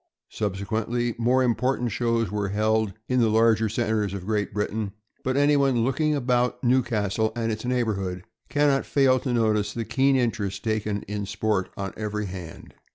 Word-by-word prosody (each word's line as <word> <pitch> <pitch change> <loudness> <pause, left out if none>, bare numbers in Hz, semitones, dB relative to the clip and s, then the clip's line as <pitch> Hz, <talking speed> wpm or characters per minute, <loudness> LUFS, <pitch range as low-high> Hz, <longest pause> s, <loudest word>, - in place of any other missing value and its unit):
Subsequently, 110 +4 -2
more 125 +3 +3
important 125 0 0
shows 115 -4 0
were 105 -1 -1
held 110 0 +1
in 125 0 +1
the 115 -2 +4
larger 110 0 +3
centers 110 -3 -1
of 95 -2 -6
Great 105 -1 -1
Britain; 105 -1 -2 0.3
but 130 +1 0
anyone 140 -4 +3
looking 150 +4 +1
about 125 -2 0
Newcastle 110 -4 +1
and 115 -1 -1
its 110 +2 -4
neighborhood 100 -8 -1 0.3
can 145 0 +2
not 135 -1 +2
fail 130 -2 +3
to 125 - -3
notice 110 -3 +1
the 115 -1 -2
keen 135 +3 +2
interest 105 -6 -1
taken 105 -2 -1
in 105 0 -4
sport 105 -2 -1
on 100 -1 -4
every 105 -1 -3
hand. 90 -3 -9
110 Hz, 160 wpm, -25 LUFS, 105-125 Hz, 0.3 s, the